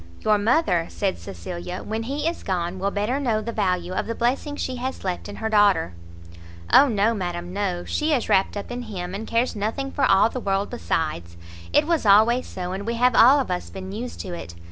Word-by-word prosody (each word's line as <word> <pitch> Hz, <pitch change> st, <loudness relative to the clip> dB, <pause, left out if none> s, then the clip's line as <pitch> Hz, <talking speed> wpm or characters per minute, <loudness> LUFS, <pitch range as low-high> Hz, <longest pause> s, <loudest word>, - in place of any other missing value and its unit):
"Your 210 Hz, -1 st, +3 dB
mother," 205 Hz, -, +2 dB
said 195 Hz, -2 st, -2 dB
Cecilia, 175 Hz, -, -7 dB
"when 220 Hz, +1 st, -3 dB
he 285 Hz, +6 st, -2 dB
is 335 Hz, -, -2 dB
gone, 180 Hz, -1 st, -2 dB
will 195 Hz, +2 st, 0 dB
better 210 Hz, +7 st, -1 dB
know 235 Hz, -6 st, +1 dB
the 225 Hz, +2 st, -4 dB
value 185 Hz, -4 st, -1 dB
of -, -, -2 dB
the 230 Hz, -, -3 dB
blessing 260 Hz, +5 st, -1 dB
she 260 Hz, -3 st, -3 dB
has 260 Hz, +2 st, -4 dB
left 185 Hz, -2 st, -3 dB
in 205 Hz, -, -7 dB
her 220 Hz, -, -3 dB
daughter." 205 Hz, -, +3 dB, 0.8 s
"O 285 Hz, -, +8 dB
no, 220 Hz, -1 st, +2 dB
madam, 175 Hz, -3 st, -4 dB
no; 190 Hz, -3 st, -2 dB
she 305 Hz, +1 st, -1 dB
is 270 Hz, -6 st, +1 dB
wrapt 195 Hz, +2 st, +2 dB
up 205 Hz, -, -6 dB
in 245 Hz, 0 st, -4 dB
him, 185 Hz, -6 st, -6 dB
and 215 Hz, +3 st, -5 dB
cares 230 Hz, +2 st, 0 dB
nothing 225 Hz, +7 st, -2 dB
for 285 Hz, -, -2 dB
all 195 Hz, +2 st, +5 dB
the 255 Hz, -, -5 dB
world 195 Hz, -2 st, -1 dB
besides. 155 Hz, -, -3 dB, 0.3 s
It 295 Hz, -, +4 dB
was 335 Hz, -1 st, +1 dB
always 220 Hz, +5 st, +5 dB
so, 180 Hz, -1 st, -5 dB
and 195 Hz, +3 st, -5 dB
we 235 Hz, -, -1 dB
have 250 Hz, +1 st, +3 dB
all 260 Hz, +6 st, +7 dB
of 255 Hz, -9 st, -2 dB
us 180 Hz, -, -3 dB
been 190 Hz, 0 st, -7 dB
used 235 Hz, +5 st, -6 dB
to 185 Hz, -, -6 dB
it. 85 Hz, -, -8 dB
205 Hz, 220 wpm, -24 LUFS, 185-245 Hz, 0.8 s, O